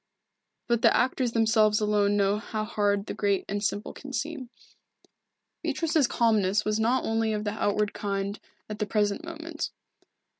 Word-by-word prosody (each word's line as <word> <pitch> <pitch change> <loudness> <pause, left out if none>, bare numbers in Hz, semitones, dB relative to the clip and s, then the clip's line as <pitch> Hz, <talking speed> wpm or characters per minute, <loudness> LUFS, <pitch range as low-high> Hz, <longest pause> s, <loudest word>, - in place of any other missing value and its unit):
But 235 -2 +1
the - - +5
actors 250 -1 +1
themselves 220 -2 +3
alone 205 -1 +2
know 200 +1 +2
how 215 0 -4
hard 205 -2 0
the - - -4
great 200 -2 0
and 205 +1 -3
simple 205 0 -2
can 275 -1 -10
seem. 270 0 -4 1.1
Beatrice's 320 -5 +1
calmness 210 -4 +2
was 215 +1 0
not 240 +4 +2
only 225 0 0
of 210 0 -2
the 205 - -1
outward 205 0 0
kind 200 0 -3 0.3
at 210 -1 -6
the 210 - -1
present 205 +1 0
moment. 330 -1 -5
215 Hz, 155 wpm, -27 LUFS, 205-235 Hz, 1.1 s, the